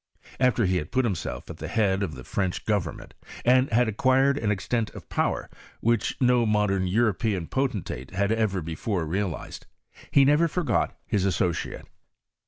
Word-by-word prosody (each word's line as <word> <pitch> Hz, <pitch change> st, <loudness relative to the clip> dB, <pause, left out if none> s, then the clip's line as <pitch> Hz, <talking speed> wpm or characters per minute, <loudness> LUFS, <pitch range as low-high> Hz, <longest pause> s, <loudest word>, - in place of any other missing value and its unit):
After 125 Hz, -3 st, +3 dB
he 90 Hz, 0 st, +2 dB
had 75 Hz, -2 st, -4 dB
put 130 Hz, -1 st, +2 dB
himself 95 Hz, -8 st, -3 dB
at -, -, -10 dB
the -, -, -6 dB
head 100 Hz, -4 st, +1 dB
of 85 Hz, -7 st, -2 dB
the 65 Hz, -, -9 dB
French 95 Hz, +3 st, -2 dB
government, 100 Hz, -7 st, -2 dB, 0.3 s
and 130 Hz, +2 st, +4 dB
had 120 Hz, +1 st, +3 dB
acquired 130 Hz, +5 st, +3 dB
an 110 Hz, -7 st, 0 dB
estent 110 Hz, +3 st, -1 dB
of -, -, -10 dB
power, -, -, -1 dB, 0.3 s
which 115 Hz, -1 st, +1 dB
no 125 Hz, -2 st, +4 dB
mo 105 Hz, -1 st, +3 dB
dern 95 Hz, -2 st, 0 dB
European 105 Hz, -2 st, +1 dB
potentate 105 Hz, -, -3 dB
had 100 Hz, +3 st, 0 dB
ever 110 Hz, -5 st, 0 dB
before 85 Hz, +3 st, -2 dB
realized, 95 Hz, +1 st, -4 dB, 0.4 s
he 140 Hz, -1 st, +5 dB
never 150 Hz, +4 st, +4 dB
forgot 170 Hz, 0 st, 0 dB
his 105 Hz, -5 st, 0 dB
associate. 90 Hz, -3 st, -1 dB
105 Hz, 165 wpm, -26 LUFS, 95-125 Hz, 0.4 s, he